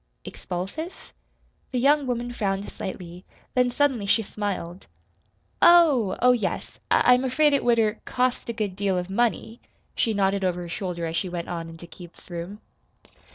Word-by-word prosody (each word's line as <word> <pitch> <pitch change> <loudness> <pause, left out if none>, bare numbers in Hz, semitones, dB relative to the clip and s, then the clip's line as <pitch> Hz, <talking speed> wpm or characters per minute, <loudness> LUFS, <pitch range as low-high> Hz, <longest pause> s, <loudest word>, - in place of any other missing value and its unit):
"Expulsive?" 200 - -6 0.6
The 255 - -3
young 280 +2 +3
woman 240 0 -2
frowned 200 -3 -2
slightly; 180 -1 -7 0.3
then 250 -1 +3
suddenly 250 -5 +1
she 225 +3 +3
smiled. 195 -4 -5 0.7
"Oh! 300 - +5
Oh, 250 - +7
yes, 245 -3 -2
I 250 - +5
I'm 250 +1 +2
afraid 290 +3 +3
it 280 - +2
would 240 -1 +3
er 220 -1 +1
cost 250 -1 -1
a - - -1
good 210 -4 -3
deal 195 -1 0
of 180 +1 -4
money," 230 +1 -1 0.3
she 225 -2 0
nodded 195 0 +1
over 180 -1 0
her 175 - -7
shoulder 175 -2 -4
as 165 0 -3
she 185 - -1
went 175 -1 -5
on 165 -1 -4
into 165 +1 -11
Keith's 175 +1 -14
room. 175 +5 -6
205 Hz, 165 wpm, -25 LUFS, 180-250 Hz, 0.7 s, Oh